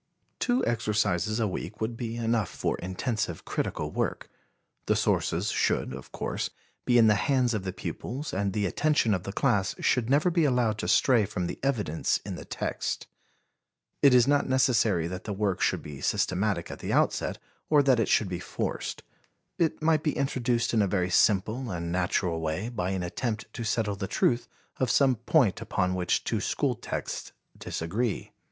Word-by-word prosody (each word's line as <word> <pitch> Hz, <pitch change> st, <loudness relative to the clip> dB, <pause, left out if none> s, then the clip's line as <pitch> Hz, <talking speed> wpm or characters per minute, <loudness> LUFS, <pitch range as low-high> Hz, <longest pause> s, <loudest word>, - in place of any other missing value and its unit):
Two 245 Hz, +1 st, +1 dB
exercises 110 Hz, -3 st, 0 dB
a 110 Hz, -, +2 dB
week 95 Hz, +1 st, -5 dB
would 110 Hz, +1 st, -2 dB
be 115 Hz, -1 st, -4 dB
enough 115 Hz, -4 st, 0 dB
for -, -, -2 dB
intensive 105 Hz, +6 st, -3 dB
critical -, -, -2 dB
work. -, -, -2 dB, 0.6 s
The -, -, +3 dB
sources -, -, +1 dB
should, -, -, 0 dB
of 65 Hz, 0 st, -9 dB
course, -, -, -3 dB, 0.4 s
be 125 Hz, -, +4 dB
in 115 Hz, -, +7 dB
the 105 Hz, -, +6 dB
hands 125 Hz, +5 st, +2 dB
of 105 Hz, -3 st, -2 dB
the 95 Hz, -, -2 dB
pupils 125 Hz, -, -5 dB
and 100 Hz, +1 st, 0 dB
the 105 Hz, +1 st, 0 dB
attention 145 Hz, -, +2 dB
of 90 Hz, -2 st, -2 dB
the 100 Hz, -, -3 dB
class 100 Hz, -1 st, +1 dB
should 125 Hz, -2 st, +1 dB
never 150 Hz, +6 st, +3 dB
be 170 Hz, -1 st, +2 dB
allowed 125 Hz, -6 st, +2 dB
to -, -, -2 dB
stray 125 Hz, -5 st, +4 dB
from 90 Hz, -2 st, -3 dB
the -, -, -5 dB
evidence 105 Hz, -, 0 dB
in -, -, -4 dB
the -, -, -8 dB
text. -, -, -3 dB, 1.0 s
It 140 Hz, -3 st, +7 dB
is 125 Hz, 0 st, +6 dB
not 145 Hz, -1 st, +2 dB
necessary 115 Hz, -9 st, +3 dB
that 90 Hz, +2 st, -5 dB
the 105 Hz, -, -3 dB
work 100 Hz, -2 st, -1 dB
should -, -, +1 dB
be 70 Hz, -2 st, -8 dB
systematic 95 Hz, -2 st, 0 dB
at -, -, -8 dB
the -, -, -4 dB
outset -, -, +1 dB, 0.3 s
or 150 Hz, -2 st, +5 dB
that 130 Hz, -3 st, +4 dB
it 115 Hz, -, +1 dB
should 105 Hz, -, +3 dB
be 90 Hz, -1 st, -4 dB
forced. -, -, -4 dB, 0.6 s
It 160 Hz, -2 st, 0 dB
might 155 Hz, -1 st, +3 dB
be 150 Hz, -1 st, -1 dB
introduced 120 Hz, -4 st, 0 dB
in 110 Hz, -, +4 dB
a 100 Hz, -, +2 dB
very 90 Hz, -2 st, 0 dB
simple 110 Hz, +7 st, +2 dB
and 85 Hz, -3 st, -3 dB
natural 90 Hz, -1 st, 0 dB
way 80 Hz, +8 st, -2 dB
by 95 Hz, -7 st, -2 dB
an 95 Hz, -1 st, -2 dB
attempt 110 Hz, +4 st, -3 dB
to 115 Hz, -, -5 dB
settle 110 Hz, -2 st, 0 dB
the 95 Hz, 0 st, -4 dB
truth 120 Hz, +5 st, +1 dB, 0.3 s
of 130 Hz, -, 0 dB
some 130 Hz, 0 st, +4 dB
point -, -, +2 dB
upon 90 Hz, 0 st, 0 dB
which 90 Hz, -1 st, 0 dB
two -, -, -1 dB
school -, -, 0 dB
texts -, -, -5 dB, 0.2 s
disagree. 100 Hz, +7 st, -3 dB
110 Hz, 185 wpm, -28 LUFS, 95-125 Hz, 1.0 s, in